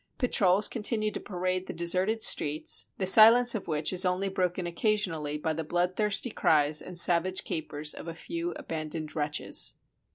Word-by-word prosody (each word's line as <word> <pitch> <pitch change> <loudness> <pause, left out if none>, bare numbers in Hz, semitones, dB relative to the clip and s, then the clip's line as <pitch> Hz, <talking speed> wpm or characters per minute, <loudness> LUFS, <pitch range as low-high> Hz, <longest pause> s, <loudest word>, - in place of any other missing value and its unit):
Patrols 200 -5 +2
continue 215 -1 -2
to - - -6
parade 185 -1 -4
the - - -6
deserted 185 +6 -1
streets, 150 +1 +1
the 190 - -2
silence 230 +5 +7
of 220 - -6
which 155 +1 -1
is 185 +1 +2
only 185 +1 -1
broken 180 -1 -2
occasionally 170 -5 -2
by 160 +1 -3
the 160 +1 -4
bloodthirsty 185 +8 -1
cries 150 -5 +1
and 180 - -9
savage 175 +2 +2
capers 150 -2 -4
of - - -10
a 165 - -6
few 335 - -5
abandoned 155 - -6
wretches. 150 -1 -1
180 Hz, 160 wpm, -27 LUFS, 160-210 Hz, -, silence